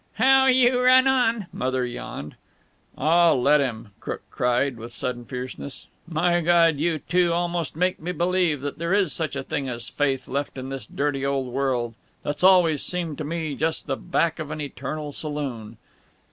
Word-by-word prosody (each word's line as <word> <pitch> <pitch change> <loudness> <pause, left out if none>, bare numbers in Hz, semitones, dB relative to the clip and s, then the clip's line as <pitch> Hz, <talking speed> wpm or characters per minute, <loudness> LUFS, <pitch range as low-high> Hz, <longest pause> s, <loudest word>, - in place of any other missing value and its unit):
"How 265 0 +5
you 255 -1 +4
run 255 +1 +6
on," 235 -5 +2
Mother 130 0 -1
yawned. 100 - -7 0.6
"Aw, 165 +3 +4
let 140 +3 +4
him," 115 -5 -3
Crook - - -5
cried, 125 +1 +1
with 115 +1 -9
sudden 120 0 -4
fierceness. 130 +2 -7 0.2
"My 175 +1 +1
Gawd! 165 -2 +4
you 165 +1 +1
two 175 +2 +1
almost 170 -2 -1
make 180 +3 0
me 170 +3 -4
believe 175 -4 +1
that 145 +1 -5
there 170 +3 +1
is 195 -6 +1
such 160 -4 -3
a 140 - -3
thing 135 0 -3
as 120 -1 -3
faith 135 -3 -1
left 140 +1 -3
in 130 0 -5
this 135 -5 -6
dirty 140 -1 -2
old 135 -3 -1
world, 125 -4 0 0.3
that's 145 +3 -3
always 180 -6 +5
seemed 170 -5 -3
to - - -2
me 160 0 -3
just 160 +3 -1
the - - -1
back 170 -2 0
of 155 -2 -5
an 155 0 -5
eternal 145 +1 -5
saloon. 135 -8 -5
150 Hz, 175 wpm, -24 LUFS, 130-175 Hz, 0.6 s, run